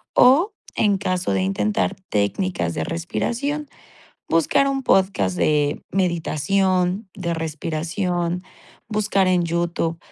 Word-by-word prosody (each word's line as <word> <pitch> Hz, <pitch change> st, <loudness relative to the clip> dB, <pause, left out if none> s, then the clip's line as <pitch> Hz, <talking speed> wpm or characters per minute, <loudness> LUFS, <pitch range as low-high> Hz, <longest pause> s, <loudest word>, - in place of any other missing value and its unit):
o, 305 Hz, -, +5 dB, 0.2 s
en 205 Hz, -3 st, +3 dB
caso 185 Hz, -, -1 dB
de 95 Hz, -, +1 dB
intentar 105 Hz, -, 0 dB
técnicas 100 Hz, -, 0 dB
de -, -, -1 dB
respiración, 250 Hz, -, -2 dB, 0.6 s
buscar 165 Hz, -, +3 dB
un 270 Hz, -1 st, -1 dB
podcast 185 Hz, -, +2 dB
de 145 Hz, -1 st, +1 dB
meditación, 185 Hz, +2 st, +1 dB
de 170 Hz, -4 st, -2 dB
respiración, 170 Hz, +3 st, -2 dB, 0.5 s
buscar 210 Hz, -3 st, +1 dB
en 180 Hz, -1 st, +3 dB
YouTube 170 Hz, 0 st, -1 dB
180 Hz, 105 wpm, -22 LUFS, 160-200 Hz, 0.6 s, o